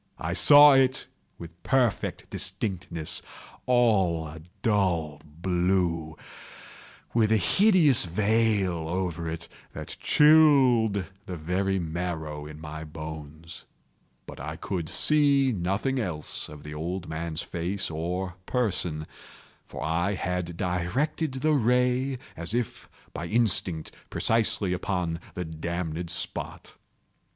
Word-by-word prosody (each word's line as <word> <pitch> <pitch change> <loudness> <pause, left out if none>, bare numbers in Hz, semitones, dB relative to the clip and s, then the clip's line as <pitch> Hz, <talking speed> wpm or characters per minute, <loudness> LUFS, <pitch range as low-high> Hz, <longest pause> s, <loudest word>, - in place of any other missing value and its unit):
I 85 +2 -3
saw 145 - +8
it 135 0 +3 0.3
with 85 0 -11
perfect 125 -5 0
distinctness—all 95 +1 -1
a 80 +1 -10 0.2
dull 90 - +1
blue, 85 0 -1 1.0
with 110 -2 +3
a 110 - +5
hideous 165 - +4
veil 100 -3 +1
over 85 -2 -2
it 85 +1 -6 0.3
that - - -7
chilled 135 -10 +5 0.2
the 90 - -5
very 95 +5 -1
marrow 80 -3 -4
in 75 0 -10
my 80 0 -7
bones; 80 +1 -9 0.6
but - - -10
I 75 +4 -5
could 85 -2 -4
see 140 -3 +3
nothing 100 +7 -1
else 85 -9 -3
of 75 -1 -11
the 75 - -8
old 85 +4 -4
man's 80 +1 -4
face 90 +2 -3
or 90 +4 -3
person: 90 -10 -1 0.6
for - - -7
I 85 +6 0
had 90 -2 -3
directed 105 - -1
the 155 +4 +1
ray 125 +1 +2 0.2
as 85 +7 -2
if 120 -3 -3 0.2
by 85 - -5
instinct, 95 -7 0 0.2
precisely 110 -4 +1
upon 90 -3 -2 0.2
the 90 - -3
damned 85 +1 -4
spot. - - -5
90 Hz, 110 wpm, -27 LUFS, 80-115 Hz, 1.0 s, saw